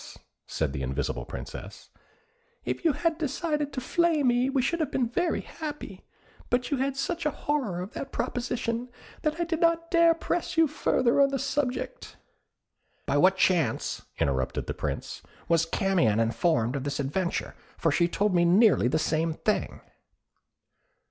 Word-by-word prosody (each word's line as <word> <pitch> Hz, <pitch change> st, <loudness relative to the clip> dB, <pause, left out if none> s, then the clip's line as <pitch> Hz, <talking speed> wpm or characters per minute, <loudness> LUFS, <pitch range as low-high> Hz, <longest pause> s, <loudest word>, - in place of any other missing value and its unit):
said 75 Hz, -4 st, -2 dB
the 70 Hz, -, -4 dB
invisible 65 Hz, -2 st, -2 dB
Princess, 100 Hz, -, -9 dB, 0.7 s
"if -, -, -3 dB
you 325 Hz, -3 st, +4 dB
had 330 Hz, +2 st, 0 dB
decided 300 Hz, 0 st, -1 dB
to 275 Hz, -, -3 dB
flay 325 Hz, +3 st, +1 dB
me 245 Hz, 0 st, +3 dB
we 270 Hz, 0 st, +1 dB
should 330 Hz, +7 st, 0 dB
have 310 Hz, -4 st, 0 dB
been 255 Hz, -4 st, 0 dB
very 335 Hz, +9 st, 0 dB
happy; 295 Hz, -, -7 dB, 0.5 s
but 250 Hz, +3 st, 0 dB
you 285 Hz, -, +2 dB
had 270 Hz, +1 st, -1 dB
such 335 Hz, +4 st, -2 dB
a 300 Hz, -, +2 dB
horror 275 Hz, -12 st, -2 dB
of 185 Hz, -, -7 dB
that 275 Hz, -, -6 dB
proposition, 245 Hz, -1 st, -2 dB, 0.3 s
that 305 Hz, +1 st, -1 dB
I -, -, +2 dB
did 330 Hz, -1 st, -2 dB
not 335 Hz, 0 st, +2 dB
dare 335 Hz, -1 st, +5 dB
press 330 Hz, +1 st, -2 dB
you 325 Hz, -1 st, +6 dB
further 270 Hz, -3 st, +2 dB
on 275 Hz, -, +5 dB
the 275 Hz, -, -1 dB
subject." 275 Hz, -, -3 dB, 0.9 s
"By 140 Hz, -, +1 dB
what 190 Hz, +5 st, +5 dB
chance," 180 Hz, -4 st, +1 dB, 0.2 s
interrupted 65 Hz, -2 st, -1 dB
the -, -, -3 dB
Prince, -, -, -4 dB, 0.3 s
"was 165 Hz, -1 st, +3 dB
Camion 165 Hz, -, +2 dB
informed 115 Hz, +1 st, +1 dB
of 135 Hz, -, -2 dB
this 145 Hz, 0 st, -3 dB
adventure, 170 Hz, +6 st, -2 dB, 0.2 s
for 165 Hz, -, +1 dB
she 170 Hz, +4 st, +3 dB
told 200 Hz, +3 st, 0 dB
me 175 Hz, -1 st, +4 dB
nearly 185 Hz, -, +5 dB
the 130 Hz, -, +1 dB
same 160 Hz, +1 st, 0 dB
thing?" 215 Hz, -, -1 dB
245 Hz, 160 wpm, -27 LUFS, -, 0.9 s, you